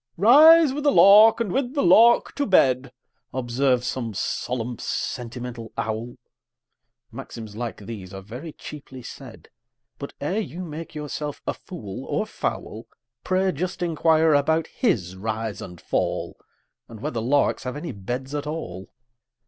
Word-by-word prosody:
"Rise 300 Hz, -, +7 dB
with 295 Hz, +1 st, -4 dB
the 290 Hz, -, +4 dB
lark, 215 Hz, +1 st, +7 dB
and 225 Hz, -5 st, -1 dB
with 265 Hz, +4 st, -1 dB
the 280 Hz, -, +1 dB
lark 230 Hz, +7 st, +5 dB
to 285 Hz, -, -2 dB
bed," 130 Hz, -, +3 dB, 0.4 s
Observes 125 Hz, 0 st, +1 dB
some 115 Hz, -5 st, -3 dB
solemn, 120 Hz, +2 st, -3 dB
sentimental 120 Hz, -1 st, -5 dB
owl; 110 Hz, +2 st, -3 dB, 1.0 s
Maxims 110 Hz, -3 st, -9 dB
like 120 Hz, 0 st, -4 dB
these 100 Hz, -3 st, -9 dB
are 95 Hz, -1 st, -8 dB
very 125 Hz, -, -8 dB
cheaply 135 Hz, -4 st, -10 dB
said; 125 Hz, -1 st, -11 dB, 0.5 s
But, 140 Hz, -, -7 dB
ere 180 Hz, +9 st, -1 dB
you 185 Hz, -4 st, -5 dB
make 160 Hz, 0 st, -8 dB
yourself 150 Hz, -1 st, -5 dB
a -, -, -1 dB
fool 105 Hz, -, -9 dB
or -, -, -1 dB
fowl, 110 Hz, +2 st, -5 dB, 0.4 s
Pray 190 Hz, 0 st, +1 dB
just 175 Hz, +4 st, -4 dB
inquire 160 Hz, -1 st, +3 dB
about 160 Hz, +3 st, +2 dB
his 105 Hz, -, -1 dB
rise 110 Hz, +1 st, -4 dB
and 90 Hz, -2 st, -9 dB
fall, -, -, -2 dB, 0.5 s
And 115 Hz, -2 st, -10 dB
whether 115 Hz, -, -3 dB
larks 140 Hz, +5 st, +1 dB
have 125 Hz, 0 st, -5 dB
any 150 Hz, +1 st, -5 dB
beds 125 Hz, +6 st, -5 dB
at 150 Hz, 0 st, -3 dB
all! 95 Hz, -, -6 dB
135 Hz, 145 wpm, -24 LUFS, 115-175 Hz, 1.0 s, Rise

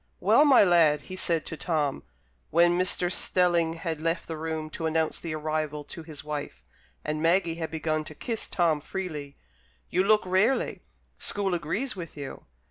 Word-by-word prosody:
"Well, 300 Hz, -, +5 dB
my 275 Hz, -6 st, +7 dB
lad," 165 Hz, -5 st, +4 dB
he 185 Hz, -, -8 dB
said 170 Hz, -3 st, 0 dB
to -, -, -5 dB
Tom, 150 Hz, -4 st, -1 dB, 0.5 s
when 175 Hz, +1 st, +4 dB
Mr. 180 Hz, 0 st, +1 dB
Stelling 175 Hz, -3 st, +2 dB
had 165 Hz, -2 st, -4 dB
left 165 Hz, +1 st, -1 dB
the 160 Hz, -, -5 dB
room 155 Hz, 0 st, -4 dB
to 160 Hz, -, -3 dB
announce 160 Hz, 0 st, 0 dB
the 165 Hz, -2 st, -4 dB
arrival 155 Hz, -1 st, -2 dB
to 165 Hz, -, -8 dB
his 155 Hz, -2 st, -10 dB
wife, 145 Hz, -, -5 dB, 0.4 s
and 155 Hz, 0 st, -2 dB
Maggie 170 Hz, +1 st, +3 dB
had 160 Hz, -, -2 dB
begun 155 Hz, -1 st, -1 dB
to 155 Hz, -, -9 dB
kiss 230 Hz, +5 st, -3 dB
Tom 165 Hz, -4 st, +1 dB
freely, 150 Hz, -6 st, -5 dB, 0.6 s
"you 185 Hz, -, +3 dB
look 215 Hz, +1 st, +4 dB
rarely. 190 Hz, +8 st, +1 dB, 0.4 s
School 200 Hz, -2 st, -1 dB
agrees 175 Hz, -, -2 dB
with 170 Hz, -4 st, -8 dB
you." 140 Hz, -2 st, -7 dB
165 Hz, 170 wpm, -27 LUFS, 155-180 Hz, 0.6 s, my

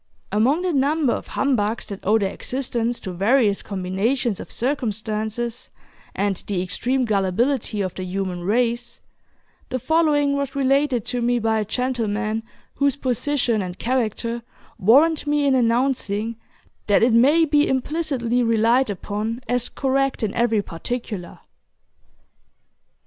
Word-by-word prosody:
Among 255 Hz, -, +2 dB
the 365 Hz, -2 st, 0 dB
number 280 Hz, -1 st, +2 dB
of -, -, -5 dB
humbugs 230 Hz, -5 st, 0 dB
that 200 Hz, -2 st, -7 dB
owe 215 Hz, +3 st, +4 dB
their 195 Hz, -3 st, -1 dB
existence 240 Hz, -2 st, -2 dB
to 190 Hz, -, -5 dB
various 205 Hz, +2 st, +2 dB
combinations 200 Hz, +4 st, -1 dB
of -, -, -8 dB
circumstances 225 Hz, -2 st, -2 dB, 0.5 s
and 200 Hz, -1 st, 0 dB
the 185 Hz, -3 st, -1 dB
extreme 250 Hz, +8 st, 0 dB
gullibility 215 Hz, +3 st, 0 dB
of 185 Hz, -2 st, -2 dB
the 185 Hz, -, -6 dB
human 185 Hz, -1 st, -3 dB
race, 235 Hz, +4 st, 0 dB, 0.7 s
the 255 Hz, -, -1 dB
following 295 Hz, 0 st, +2 dB
was 280 Hz, -1 st, -3 dB
related 275 Hz, -3 st, +2 dB
to 245 Hz, -1 st, -2 dB
me 240 Hz, +1 st, +2 dB
by 225 Hz, -1 st, +1 dB
a 210 Hz, -, -1 dB
gentleman 225 Hz, -2 st, -1 dB, 0.3 s
whose 280 Hz, -1 st, +1 dB
position 255 Hz, -3 st, 0 dB
and 180 Hz, -1 st, -5 dB
character 235 Hz, -1 st, -1 dB, 0.4 s
warrant 295 Hz, -, +4 dB
me 295 Hz, 0 st, +2 dB
in 275 Hz, -, +3 dB
announcing 230 Hz, -3 st, +1 dB, 0.5 s
that 205 Hz, +1 st, +4 dB
it 235 Hz, 0 st, +4 dB
may 290 Hz, +8 st, +5 dB
be 295 Hz, -1 st, +3 dB
implicitly 260 Hz, -3 st, 0 dB
relied 230 Hz, +2 st, +3 dB
upon 210 Hz, +4 st, -3 dB
as 245 Hz, +1 st, 0 dB
correct 270 Hz, -2 st, 0 dB
in 205 Hz, -, -1 dB
every 225 Hz, -3 st, +1 dB
particular. 195 Hz, 0 st, -5 dB
235 Hz, 135 wpm, -22 LUFS, 210-270 Hz, 0.7 s, may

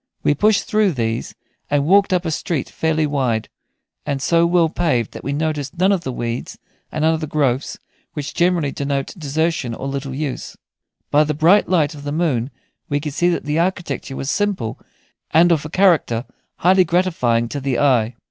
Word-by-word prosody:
We -, -, +3 dB
pushed 210 Hz, +7 st, +3 dB
through 210 Hz, -4 st, +2 dB
these, 115 Hz, -3 st, -3 dB, 0.3 s
and 145 Hz, -1 st, +1 dB
walked 200 Hz, +4 st, +4 dB
up 180 Hz, -1 st, +1 dB
a 160 Hz, -, -1 dB
street 155 Hz, -2 st, -2 dB
fairly 160 Hz, -1 st, 0 dB
wide, 130 Hz, -7 st, -1 dB, 0.5 s
and 140 Hz, -1 st, -2 dB
so 170 Hz, +5 st, +3 dB
well 170 Hz, -1 st, +3 dB
paved 155 Hz, -9 st, 0 dB
that -, -, -9 dB
we 140 Hz, -, -2 dB
noticed 150 Hz, 0 st, -2 dB
none 185 Hz, +3 st, +3 dB
of 195 Hz, -3 st, +1 dB
the 130 Hz, -, -4 dB
weeds 120 Hz, 0 st, -4 dB, 0.3 s
and 155 Hz, 0 st, -1 dB
other 160 Hz, -1 st, +1 dB
growths 140 Hz, -3 st, 0 dB, 0.4 s
which 145 Hz, -2 st, -5 dB
generally 175 Hz, -5 st, +1 dB
denote 140 Hz, -1 st, -3 dB
desertion 155 Hz, -, -1 dB
or 135 Hz, -, -5 dB
little 135 Hz, -1 st, -4 dB
use. 145 Hz, -2 st, -4 dB, 0.5 s
By 150 Hz, +1 st, +5 dB
the 150 Hz, 0 st, -2 dB
bright 170 Hz, +7 st, +4 dB
light 165 Hz, -4 st, +2 dB
of 145 Hz, -, -10 dB
the 145 Hz, -, -4 dB
moon 145 Hz, -7 st, 0 dB, 0.4 s
we 145 Hz, -1 st, +1 dB
could 150 Hz, -1 st, -5 dB
see 175 Hz, +4 st, +2 dB
that 175 Hz, -, -1 dB
the 150 Hz, +2 st, 0 dB
architecture 170 Hz, -5 st, -2 dB
was 135 Hz, +1 st, -3 dB
simple, 195 Hz, -, -1 dB, 0.5 s
and 170 Hz, +2 st, +5 dB
of 155 Hz, -3 st, +1 dB
a -, -, -5 dB
character 160 Hz, -10 st, +2 dB, 0.3 s
highly 185 Hz, +2 st, +4 dB
gratifying 160 Hz, -10 st, +1 dB
to 145 Hz, -, -4 dB
the 135 Hz, -2 st, -1 dB
eye. 125 Hz, -5 st, +2 dB
150 Hz, 185 wpm, -20 LUFS, 135-170 Hz, 0.5 s, By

